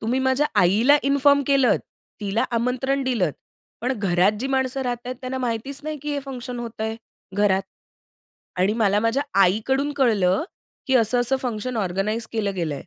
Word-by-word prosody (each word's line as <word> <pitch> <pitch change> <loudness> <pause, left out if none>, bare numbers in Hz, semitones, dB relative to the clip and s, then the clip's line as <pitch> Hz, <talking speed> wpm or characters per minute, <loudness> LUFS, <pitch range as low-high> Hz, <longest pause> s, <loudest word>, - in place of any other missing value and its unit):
तुम्ही 240 +4 0
माझ्या 265 +3 +2
आईला 220 +11 +5
इन्फॉर्म 280 +1 +4
केलंत, 270 -5 +3 0.4
तिला 205 +2 0
आमंत्रण 255 +4 0
दिलंत, 205 - 0 0.5
पण 250 +3 0
घरात 190 0 +3
जी 265 - -1
माणसं 265 0 0
राहत 245 -1 -4
आहेत, 255 - -4
त्यांना 260 0 -4
माहितीच 250 +3 -3
नाही, 310 0 -3
की 295 0 -3
हे 285 - -2
फंक्शन 250 -2 -6
होतंय, 225 -1 -4 0.4
घरात. 195 -2 +3 0.9
आणि 185 +3 +2
मला 205 -1 +3
माझ्या 230 +5 +1 0.2
आईकडून 265 +10 +1
कळलं, 210 - +2 0.4
की 265 - +1
असं-असं 245 +3 +2
फंक्शन 245 0 -3
ऑर्गनाइज 210 +3 -1
केलं 205 -3 -1
गेलं 175 - -1
आहे. 155 - -3
240 Hz, 160 wpm, -23 LUFS, 210-265 Hz, 0.9 s, आईला